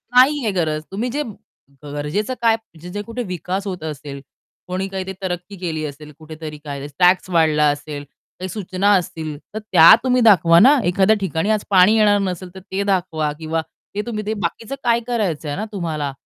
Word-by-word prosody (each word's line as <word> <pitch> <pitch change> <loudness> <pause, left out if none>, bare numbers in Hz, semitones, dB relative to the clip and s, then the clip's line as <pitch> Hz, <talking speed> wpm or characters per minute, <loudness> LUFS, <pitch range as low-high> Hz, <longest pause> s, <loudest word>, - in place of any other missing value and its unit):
नाहीये 260 -3 +5
गरज. 155 -4 -1
तुम्ही 230 +6 -2
जे 295 +2 -1 0.6
गरजेचं 150 - -3
काय? 225 -1 +4 0.3
जे-जे 180 +4 -5
कुठे 230 +3 -5
विकास 185 +1 -4
होत 180 -4 -5
असेल, 145 -2 -6 0.5
कोणी 185 +2 -2
काही 190 -1 -4
ते 190 - -4
तरक्की 180 +1 -4
केली 160 -3 -3
असेल, 150 +1 -9
कुठेतरी 155 -1 -8
काय 140 -1 -6
टॅक्स 180 +1 +4
वाढला 155 -3 +3
असेल, 145 0 -4 0.4
काही 185 0 -5
सूचना 195 0 0
असतील 160 -4 -3 0.2
तर 215 - -3
त्या 165 -6 +7
तुम्ही 250 -1 +2
दाखवा 175 -6 +6
ना. 280 +6 +7
एखाद्या 190 +4 +3
ठिकाणी 170 +2 -1
आज 215 -1 0
पाणी 195 +3 +6
येणार 205 -1 +4
नसेल 185 -1 -4
तर - - -7
ते 195 +1 -1
दाखवा 160 -5 0
किंवा 160 0 -2 0.3
ते 210 - 0
तुम्ही 215 -3 -4
ते 215 - -1
बाकीचं 225 +10 -4
काय 235 -1 +3
करायचंय 165 -11 -1
ना 215 - -3
तुम्हाला? 155 -7 -3
180 Hz, 175 wpm, -20 LUFS, 155-210 Hz, 0.6 s, त्या